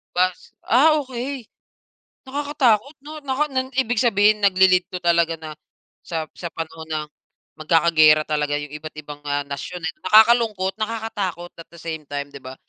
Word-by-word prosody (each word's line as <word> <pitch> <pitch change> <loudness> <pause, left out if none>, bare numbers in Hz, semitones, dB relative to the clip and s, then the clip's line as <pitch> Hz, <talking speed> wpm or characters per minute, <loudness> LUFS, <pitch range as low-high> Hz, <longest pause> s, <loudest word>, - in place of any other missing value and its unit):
Bas 185 0 -1
ah, 300 +6 +4
okey. 260 0 -5 0.8
Nakakatakot 280 -2 +1
'no? 305 +1 -8
Na 265 - -1
kan 300 +2 0
nan 260 -1 -1
ibig 245 -2 +1
sabihin 210 -3 +3
nagli-lead 185 -2 +4
'to 185 -2 -6
talaga 170 -1 +2
na 160 -1 -9 0.5
sa 165 -2 -3
sa 175 - -7
panahon 160 0 -7
ng 155 -1 -3 0.5
magkakagera 155 -1 +4
talaga 150 -1 0
yung 145 - -6
iba't-ibang, 150 -1 -9
ah, 145 0 0
nasyon, 140 +6 -6
eh. 160 - -1 0.2
Nakakalungkot, 215 -4 +4
nakakatakot 215 -6 -4
at 165 - -11
the 170 - -14
same 160 -2 -6
time, 145 0 -5
'di 140 - -10
ba? 130 0 -8
180 Hz, 155 wpm, -22 LUFS, 155-235 Hz, 0.8 s, ah